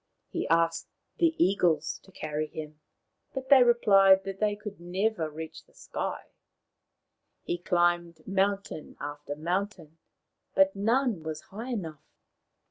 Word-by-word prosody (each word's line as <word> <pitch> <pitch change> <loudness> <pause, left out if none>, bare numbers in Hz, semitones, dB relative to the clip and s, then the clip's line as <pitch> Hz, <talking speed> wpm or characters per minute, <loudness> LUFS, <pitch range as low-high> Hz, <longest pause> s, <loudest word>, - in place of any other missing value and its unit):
He - - -2
asked 165 0 +2 0.3
the 330 -2 +3
eagles 170 -4 +2
to 190 - -20
carry 155 -2 -3
him, 155 -1 -8 0.6
but 265 0 -5
they 275 -2 +8
replied 195 -5 +6
that 195 0 -6
they 210 -1 +1
could 210 -2 -8
never 180 -1 -1
reach 160 +1 -8
the - - -28
sky. - - -4 1.2
He 175 - -2
climbed 175 -2 0
mountain 195 -4 -1
after 145 0 -6
mountain, 170 0 -3 0.6
but 290 0 +4
none 230 -1 +1
was 155 -1 -5
high 225 +6 -8
enough. 165 - -4
180 Hz, 125 wpm, -28 LUFS, 160-210 Hz, 1.2 s, they